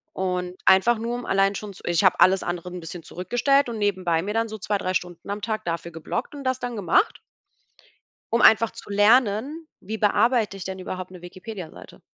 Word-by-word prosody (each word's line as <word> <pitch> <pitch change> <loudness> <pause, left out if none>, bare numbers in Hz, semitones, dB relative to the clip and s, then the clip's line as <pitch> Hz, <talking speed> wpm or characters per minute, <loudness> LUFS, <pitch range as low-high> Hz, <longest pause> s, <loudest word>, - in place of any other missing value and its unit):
Und 180 -1 -2
einfach 195 +5 +5
nur, 230 +2 -3
um 245 - -6
allein 195 +1 +2
schon 210 0 -6
zu - - -16
ich 175 +2 +1
habe 185 - +4
alles 190 0 +5
andere 175 0 -4
'n 180 -1 -7
bisschen 165 +1 -8
zurückgestellt 245 - +1
und 230 - -4
nebenbei 185 -5 0
mir 205 +3 -4
dann 225 0 0
so 220 - -6
2, 205 0 -1
3 185 -1 -2
Stunden 175 0 -4
am 205 +1 -3
Tag 215 0 -3
dafür 170 0 -4
geblockt 165 - -5
und 280 - -8
das 260 -1 -1
dann 245 -1 -4
gemacht 205 - +1 1.1
um 230 - +3
einfach 225 0 +6
zu - - -12
lernen, 230 +8 +2
wie 220 +3 -5
bearbeite 215 0 +2
ich 195 - -7
denn 190 0 -6
überhaupt 185 0 -6
'ne 180 -2 -11
Wikipediaseite? 180 0 -10
200 Hz, 205 wpm, -24 LUFS, 180-230 Hz, 1.1 s, einfach